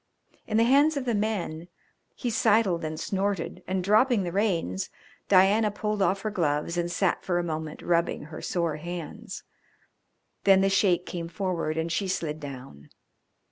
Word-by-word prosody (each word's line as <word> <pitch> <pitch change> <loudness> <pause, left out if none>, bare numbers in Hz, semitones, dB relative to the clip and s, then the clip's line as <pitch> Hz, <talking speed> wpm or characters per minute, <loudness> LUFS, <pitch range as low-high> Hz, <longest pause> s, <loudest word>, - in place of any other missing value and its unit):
In 215 - 0
the 225 - +5
hands 285 +5 +4
of 270 - -2
the 240 - 0
men 200 -6 -2 0.5
he 245 - -3
sidled 215 -6 +2
and 155 0 -4
snorted, 195 -1 -2
and, 185 0 -1
dropping 215 +2 +4
the 175 - -3
reins, 170 - 0 0.4
Diana 200 +3 +5
pulled 210 0 -2
off 195 0 +2
her 215 - -2
gloves 160 -3 0
and 175 0 -1
sat 180 +1 0
for 175 -2 0
a 175 - 0
moment 155 -2 -5
rubbing 170 0 +1
her 155 +1 -9
sore 170 -4 -1
hands. 170 0 -7 1.0
Then 195 -1 +6
the 195 0 +2
Sheik 185 -2 +3
came 170 -2 -5
forward 170 -3 -2
and 165 +1 -1
she 195 +3 0
slid 155 -4 -2
down. 130 - -9
180 Hz, 165 wpm, -27 LUFS, 165-205 Hz, 1.0 s, Then